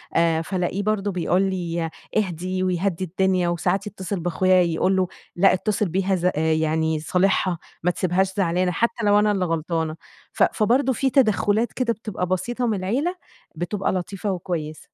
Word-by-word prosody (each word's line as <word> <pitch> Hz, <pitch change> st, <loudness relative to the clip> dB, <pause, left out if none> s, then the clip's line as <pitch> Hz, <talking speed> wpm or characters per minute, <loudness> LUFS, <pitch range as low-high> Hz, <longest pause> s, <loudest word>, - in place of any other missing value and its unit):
آآ 165 Hz, -1 st, +3 dB
فالاقيه 185 Hz, +3 st, -2 dB
برضه 205 Hz, -1 st, 0 dB
بيقول 180 Hz, +1 st, +1 dB
لي: 170 Hz, -4 st, -1 dB, 0.3 s
"اهدي." 185 Hz, -1 st, -1 dB
ويهدّي 185 Hz, 0 st, 0 dB
الدنيا 185 Hz, 0 st, +1 dB
وساعات 190 Hz, +4 st, 0 dB
يتّصل 190 Hz, -1 st, -4 dB
بأخويا 180 Hz, +2 st, +3 dB
يقول 175 Hz, +3 st, +1 dB
له: 185 Hz, -1 st, +2 dB, 0.3 s
"لأ 195 Hz, +2 st, +5 dB
اتّصل 205 Hz, 0 st, 0 dB
بيها 190 Hz, +2 st, +1 dB
ز 180 Hz, 0 st, +1 dB
يعني 160 Hz, 0 st, +1 dB
صالحها، 180 Hz, +2 st, +1 dB, 0.3 s
ما 180 Hz, -, +3 dB
تسيبهاش 185 Hz, +2 st, 0 dB
زعلانة،" 180 Hz, -1 st, +1 dB
حتّى 230 Hz, +3 st, -1 dB
لو 205 Hz, 0 st, +5 dB
أنا 210 Hz, 0 st, +3 dB
اللي 190 Hz, -3 st, 0 dB
غلطانة. 160 Hz, -1 st, -1 dB, 0.4 s
ف -, -, +3 dB
فبرضه 250 Hz, +5 st, +2 dB
في 265 Hz, +3 st, +1 dB
تدخُّلات 220 Hz, -3 st, +2 dB
كده 240 Hz, -3 st, 0 dB
بتبقى 210 Hz, -4 st, -4 dB
بسيطة 235 Hz, +7 st, -1 dB
من 215 Hz, -3 st, 0 dB
العيلة 265 Hz, -, -1 dB, 0.4 s
بتبقى 185 Hz, +4 st, -2 dB
لطيفة 195 Hz, +2 st, -3 dB
وكويسة. 165 Hz, -4 st, -4 dB
185 Hz, 155 wpm, -23 LUFS, 175-205 Hz, 0.4 s, لأ